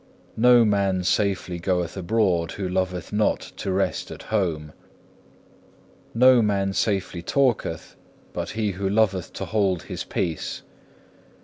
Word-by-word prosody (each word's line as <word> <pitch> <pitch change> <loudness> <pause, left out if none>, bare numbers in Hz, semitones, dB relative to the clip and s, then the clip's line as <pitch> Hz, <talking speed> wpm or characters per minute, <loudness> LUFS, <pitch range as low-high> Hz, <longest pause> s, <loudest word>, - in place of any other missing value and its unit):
No 120 0 +6
man 100 -3 +1
safely 95 -2 0
goeth 90 -1 -1
abroad 95 -3 0
who 95 -2 -3
loveth 90 0 -2
not 105 0 +2 0.2
to 95 - -3
rest 95 0 -1
at - - -9
home. 80 -8 -1 1.4
No 125 +1 +6
man 100 -2 0
safely 95 -4 -1
talketh 130 +4 0 0.4
but - - -4
he 105 -2 0
who 95 +1 -2
loveth 100 -4 +1
to - - -5
hold 100 -5 0
his - - -5
peace. 80 -3 -3
95 Hz, 125 wpm, -24 LUFS, 90-105 Hz, 1.4 s, No